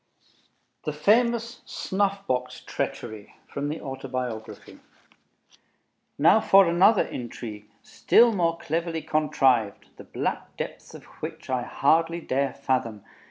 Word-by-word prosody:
THE 150 - -2
FAMOUS 235 +7 +2
"SNUFF 200 0 -2
BOX 125 0 -2
TREACHERY" 110 -1 -5
From 140 +1 -4
the 155 - -4
Autobiography 130 -5 -6 1.4
Now 165 +9 +6
for 195 -1 +6
another 180 +5 +4
intrigue, 110 -3 -7
still 235 0 +4
more 170 -4 +1
cleverly 165 0 -3
contrived, 130 -8 +1
the - - -10
black - - -4
depths - - -7
of - - -11 0.2
which - - -6
I 130 -1 +1
hardly 165 +6 +1
dare 140 -3 -1
fathom. 125 -6 -2
150 Hz, 115 wpm, -25 LUFS, 125-180 Hz, 1.4 s, Now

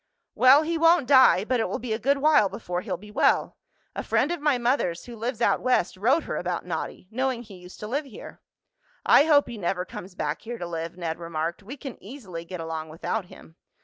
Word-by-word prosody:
"Well, 270 +4 +6
he 330 +1 -2
won't 330 -2 +5
die, 260 -8 +6
but 250 +1 0
it - - 0
will - - -2
be 230 -2 -4
a 220 - -2
good 280 +4 +2
while 290 -8 +4
before 180 -1 -4
he'll 185 -1 -4
be 210 +4 -13
well. - - +2 0.4
A - - -2
friend 310 - +1
of 345 -3 -3
my 295 -3 +2
mother's, 240 -9 0
who 240 - -9
lives 235 +1 -4
out - - +2
West, 250 -9 +1
wrote 250 - +2
her - - -4
about 175 -1 -3
Noddy, 175 +1 -5
knowing 255 0 -1
he 205 -5 -13
used 180 0 -13
to 210 - -5
live 285 +6 -2
here." 260 - -12 0.6
"I 285 - +6
hope 295 -3 +4
he 235 -3 -7
never 180 0 -1
comes 180 +1 -10
back 150 -2 -3
here 235 +2 -6
to 175 - -5
live," 165 0 -5
Ned 165 -2 -4
remarked. 165 +1 -4
"We 240 +8 -9
can 265 -2 -9
easily 195 -8 -8
get 180 0 -7
along 160 -1 -5
without 180 +6 -3
him." 160 -1 -16
215 Hz, 225 wpm, -25 LUFS, 175-260 Hz, 0.6 s, Well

